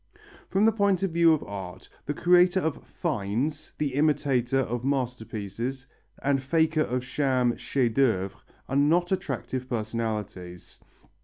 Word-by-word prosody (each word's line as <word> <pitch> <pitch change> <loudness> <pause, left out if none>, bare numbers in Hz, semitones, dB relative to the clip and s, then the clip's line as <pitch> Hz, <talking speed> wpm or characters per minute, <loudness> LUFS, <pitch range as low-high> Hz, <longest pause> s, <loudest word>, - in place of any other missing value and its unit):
From 195 +3 +3
the 225 - +6
point 200 -3 +1
of 195 - 0
view 165 0 +5
of 155 - +1
art, 95 -2 -8 0.2
the 145 - -2
creator 180 +3 +4
of 160 -4 -2
"finds," 145 - -2
the 145 -3 -1
imitator 135 -3 +2
of 120 -1 -3
masterpieces, 125 -1 -3 0.4
and 140 -1 +2
faker 160 +3 +2
of 125 -3 -1
sham 130 -3 +1
"chefs 125 -5 0
d'œuvre" 110 -8 +2 0.4
are 135 - -3
not 165 +6 +3
attractive 130 -7 -3
personalities. 110 -6 -4
135 Hz, 135 wpm, -27 LUFS, 115-160 Hz, 0.4 s, the